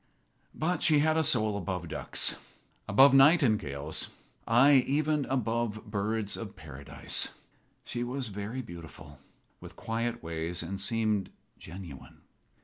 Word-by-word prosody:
But 165 +1 -1
she 155 - +4
had 155 +2 +2
a 160 - +2
soul 110 -8 +3
above 90 -3 -4
ducks - - +3 0.5
above 135 +7 +6
nightingales; 110 - +3 0.4
aye, 130 +3 +5
even 150 0 0
above 115 -3 -2
birds 105 0 -2
of 110 -4 -8
paradise. 70 -2 -2 0.5
She 120 - -4
was 125 0 -4
very 105 +6 -5
beautiful, 80 - -12 0.4
with - - -12
quiet 115 +1 -4
ways, 85 +1 -4
and 95 +3 -6
seemed 110 -2 -1 0.3
genuine. 85 -5 -11
110 Hz, 120 wpm, -29 LUFS, 90-130 Hz, 0.5 s, above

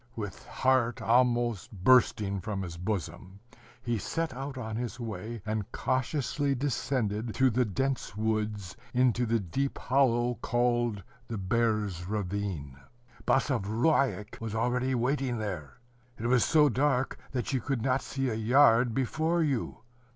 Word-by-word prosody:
With 105 -3 -6
heart 130 -3 +1
almost 120 -3 +2
bursting 100 -2 +3
from 100 0 -3
his 85 -2 -6
bosom, 90 0 -4 0.4
he 120 -2 -1
set 165 +6 -2
out 135 +1 -6
on 110 -3 -4
his 120 +1 -4
way, 115 -1 -6
and 110 -2 -3
cautiously 140 +2 0
descended 120 -4 -1
through 130 -1 +4
the 125 +2 +2
dense 130 0 -2
woods 105 -3 -2 0.2
into 125 -1 +3
the 115 +1 +2
deep 135 +9 -2
hollow 125 -2 +2
called 120 -4 +1 0.2
the 115 - -4
Bear's 105 -3 0
ravine. 95 -9 -3 0.5
Basavriuk 120 -1 +1
was 110 -1 -4
already 125 +3 +1
waiting 125 0 0
there. 90 - -5 0.4
It 115 - -5
was 120 -1 +4
so 150 -2 +5
dark, 135 0 +1
that 130 0 -2
you 130 - +1
could 135 -2 -2
not 130 0 +2
see 135 -1 -2
a 120 - -1
yard 115 +1 +4
before 160 +6 +1
you. 135 -6 -2
120 Hz, 135 wpm, -29 LUFS, 105-130 Hz, 0.5 s, so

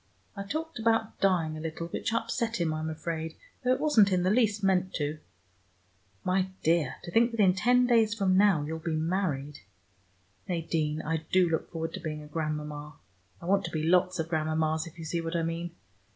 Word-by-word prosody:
I 200 - -5
talked 315 +7 -4
about 225 0 +1
dying 170 -5 +2
a - - -6
little, 160 +1 -4
which - - -2
upset 230 0 -1
him, 165 -2 +1
I'm 155 0 -3
afraid, 160 0 -4 0.3
though 250 - +2
it 255 - +2
wasn't 225 -10 +4
in 180 -1 +2
the 185 - +3
least 210 -3 +2
meant 185 -1 +2
to. 150 0 -2 1.0
My 185 0 +1 0.2
dear, 160 -4 +2
to 170 - -7
think 230 +5 +4
that 230 -2 -7
in 190 -3 +6
ten 245 +6 +3
days 225 -3 +3
from 195 -4 +2
now 195 -6 +4
you'll 160 +2 -4
be 160 0 -2
married! 155 -4 -1 0.9
Nadine, 160 -3 -1
I 160 +1 0
do 185 -1 +5
look 160 -1 -1
forward 165 -1 -4
to - - -5
being 155 -2 -5
a - - -11
grandmama: 150 -1 -4 0.4
I - - -11
want 195 +2 +2
to - - -3
be 155 -1 -2
lots 180 +2 +3
of 160 -1 -2
grandmamas, 155 0 0
if 165 - -13
you 165 - -7
see 170 +2 -1
what 165 +1 -4
I 165 - +1
mean. 165 +1 -3
170 Hz, 200 wpm, -29 LUFS, 160-200 Hz, 1.0 s, in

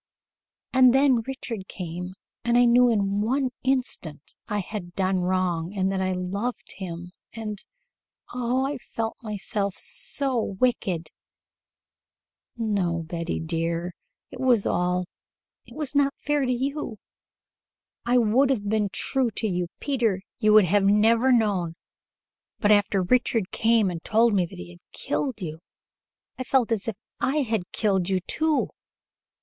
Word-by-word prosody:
"And 255 -1 +6
then 270 -3 +4
Richard 230 -7 -5
came, 180 +1 -6 0.3
and 240 0 +2
I 245 - +6
knew 245 +1 +5
in 200 -2 +1
one 255 +4 0
instant 245 - -2
that 210 - -3
I - - +1
had 190 -3 -5
done 190 -1 +1
wrong 180 0 -1
and 190 0 +1
that 190 -1 -1
I 185 0 0
loved 200 +7 -3
him 175 -2 -6 0.2
and 215 -2 -6 0.7
oh, 250 +2 0
I 280 -1 -3
felt 225 0 -4
myself 205 -2 -2
so 265 -4 -1 0.2
wicked." 185 -10 0 1.5
"No, 195 -7 0
Betty, 170 +1 -3
dear. 165 +2 -2 0.4
It - - -9
was 250 -5 +3
all 180 0 +1 0.3
" - - -62
"It - - -14
was 300 -3 -3
not 280 -1 +2
fair 295 -2 0
to - - +1
you. 265 -2 -2 1.1
I 245 +1 +2
would 245 +4 +3
have 215 -7 0
been 210 -1 +1
true 265 +2 +1
to 220 - 0
you, 180 -3 -1
Peter; 230 -9 0 0.2
you 215 -2 +4
would 215 -2 +8
have 200 +3 +3
never 225 +5 +4
known 200 -8 +2 0.8
but 210 - +3
after 200 -2 +3
Richard 225 -1 +1
came 225 -4 +3
and 165 -2 -6
told 225 +1 +3
me 185 -3 +2
he 85 - -10
had 85 - -15
killed 265 -5 -2
you, 160 -1 -5 0.8
I - - -1
felt 255 -2 +1
as 220 -2 0
if 225 - -2 0.2
I 295 +3 +1
had 220 -7 -2
killed 195 -4 +1
you, 190 -1 +2
too. 310 - 0
210 Hz, 150 wpm, -25 LUFS, 185-245 Hz, 1.5 s, would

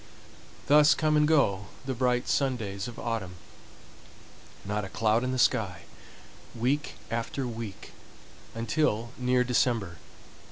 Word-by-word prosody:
Thus 150 +2 +6
come 155 -1 +1
and 150 0 +4
go 105 -11 +2 0.2
the 135 - -2
bright 125 0 0
sun 135 -2 +1
days 100 -2 -5
of 120 - -9
autumn, 105 -6 -3 1.3
not 105 +1 -2
a 100 - -6
cloud 110 +2 +1
in 130 - -1
the 130 - -2
sky, 105 -7 +1 0.7
week 130 +6 -1 0.2
after 115 +4 -2
week 115 -4 -7 0.6
until 115 0 0
near 125 0 +2
December. 115 -7 0
120 Hz, 125 wpm, -28 LUFS, 105-130 Hz, 1.3 s, Thus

